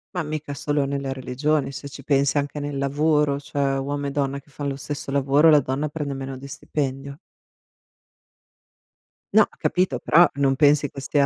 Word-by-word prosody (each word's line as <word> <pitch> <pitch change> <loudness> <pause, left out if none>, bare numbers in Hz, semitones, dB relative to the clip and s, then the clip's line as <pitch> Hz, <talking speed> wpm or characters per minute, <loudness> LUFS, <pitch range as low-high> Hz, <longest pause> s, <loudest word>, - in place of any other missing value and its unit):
Ma 180 - -1
mica 150 -1 -5
solo 145 +1 -1
nelle 140 -1 -3
religioni, 135 +2 -1
se 140 +2 -7
ci 140 - -10
pensi 140 0 +2
anche 145 +1 -2
nel 145 -1 -4
lavoro, 145 +1 +1
cioè, 145 - -6 0.2
uomo 140 +1 -3
e - - -3
donna 140 -1 -1
che 145 - -24
fan 145 0 -4
lo 135 - -4
stesso 140 0 -5
lavoro, 140 +3 +4
la 150 -1 +7
donna 140 +3 -2
prende 145 -2 -4
meno 135 0 -6
di 135 +2 -10
stipendio. 140 0 -4 2.1
No, - - +7
ho - - -4
capito, 180 -9 0
però 170 +7 +5
non 135 -1 +2
pensi 145 0 +4
che 135 - -8
sia 140 +1 +2
140 Hz, 180 wpm, -23 LUFS, 135-150 Hz, 2.1 s, la